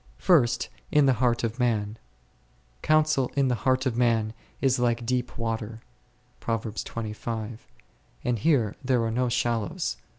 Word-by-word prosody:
First, 145 -11 +3 0.2
in 150 -1 +5
the 135 - +5
heart 120 -2 +2
of 115 +2 -2
man; 110 -3 0 0.8
Counsel 155 -4 +2
in 140 -2 +2
the - - +2 0.2
heart 130 +1 +2
of 125 -3 0
man 115 -3 +2 0.3
is 130 -2 +2
like 120 -1 +1
deep 125 0 -2
water 115 -1 -3 0.6
e, 110 -1 -3 1.1
and 120 -2 0
here 120 -6 +2
there 125 -3 +2
are 115 - -1
no 125 +2 0
shal 120 0 +1
lows. 100 - -3
120 Hz, 140 wpm, -26 LUFS, 115-130 Hz, 1.1 s, in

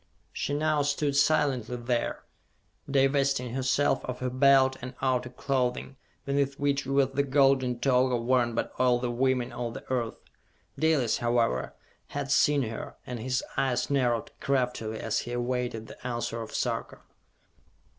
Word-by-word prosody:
She 145 - -2
now 155 0 +1
stood 145 0 0
silently 140 -5 +2
there, 120 0 -2 0.7
divesting 135 -2 +2
herself 130 +2 +1
of 125 -1 -4
her 125 -1 -3
Belt 130 0 +5
and 130 +1 -7
outer 130 -2 0
clothing, 130 +1 -2 0.3
beneath 140 0 0
which 140 -1 0
was 135 -1 +2
the 140 - +2
golden 135 -3 +3
toga 125 -1 +3
worn 120 0 +1
by - - 0
all 125 -1 +4
the 120 0 -2
women 125 0 +1
of 120 -1 -4
the - - -9
earth. 120 -3 -1 0.6
Dalis, 155 -7 +2
however, 115 - 0 0.3
had 140 -1 -4
seen 145 0 +4
her, 115 -1 -6
and 125 -2 -5
his 130 +3 -1
eyes 125 0 0
narrowed 120 -5 +1
craftily 125 -6 -1
as 110 - -1
he 120 - -5
awaited 120 -2 -2
the 125 - -9
answer 120 -1 -3
of 110 - -7
Sarka. - - -2
130 Hz, 145 wpm, -28 LUFS, 120-140 Hz, 0.7 s, Belt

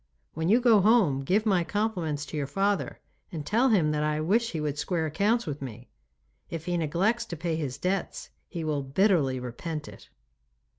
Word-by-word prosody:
When 160 +2 -1
you 225 +4 +5
go 235 -5 +5
home 200 - +4
give 200 +10 +1
my 190 -5 +3
compliments 175 -8 -2
to 145 - -8
your 145 -2 -2
father 195 +6 0 0.3
and 155 -4 -5
tell 235 - +3
him 175 -9 +3
that 150 0 0
I 150 0 0
wish 220 +9 +1
he 160 - -2
would 150 -1 -2
square 160 +2 -1
accounts 205 +10 +1
with 145 -2 -5
me. 120 -2 -8 0.6
If 165 -1 -6
he 180 -1 -1
neglects 175 +9 +1
to 170 -7 -7
pay 165 +1 -2
his 145 -5 -3
debts 185 +4 -3 0.2
he 170 -2 -5
will 150 -2 -1
bitterly 140 -2 +2
repent 150 +6 -5
it. - - -13
165 Hz, 190 wpm, -27 LUFS, 150-200 Hz, 0.6 s, you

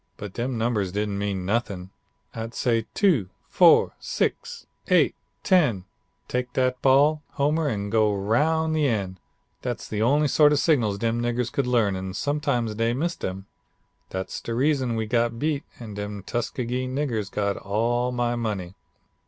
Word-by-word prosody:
But 100 -2 -7
dem 120 +1 -2
numbers 110 -5 0
didn't 100 0 -2
mean 100 -3 -2
nothin'. 100 -3 -2 0.4
I'd 115 +1 -6
say, 115 -3 0
"two, 155 - +3 0.2
four, - - +5
six, - - -2 0.2
eight, - - +4 0.3
ten 135 - +3 0.4
tek 125 0 -2
dat 130 -1 0
ball, 145 +3 +4
Homer, 150 +3 +1
an' 100 -3 -3
go 110 -1 +3
roun' 150 +11 +1
the 155 -2 +2
end." 95 -6 -2 0.4
Dat's - - -4
de 105 -1 -3
only 145 +6 +3
sort 150 +1 +5
of - - +2
signals 120 -12 +2
dem 115 +2 0
niggers 120 0 -1
could 140 -3 -1
learn 115 -6 +2
and 95 0 -5
sometimes 140 -6 0
dey 115 +2 0
missed 170 +7 -2
dem. 95 +1 -4 0.6
Dat's 95 0 -5
de 115 - -4
reason 130 -2 +1
we 110 -1 -1
got 115 +1 0
beat 150 +1 -1
and 110 -4 -8
dem 105 -1 -5
Tuskegee 125 +2 -2
niggers 130 -6 -2
got 100 -1 0
all 120 +5 0
my 120 -1 0
money. 105 -6 -3
120 Hz, 160 wpm, -25 LUFS, 105-135 Hz, 0.6 s, four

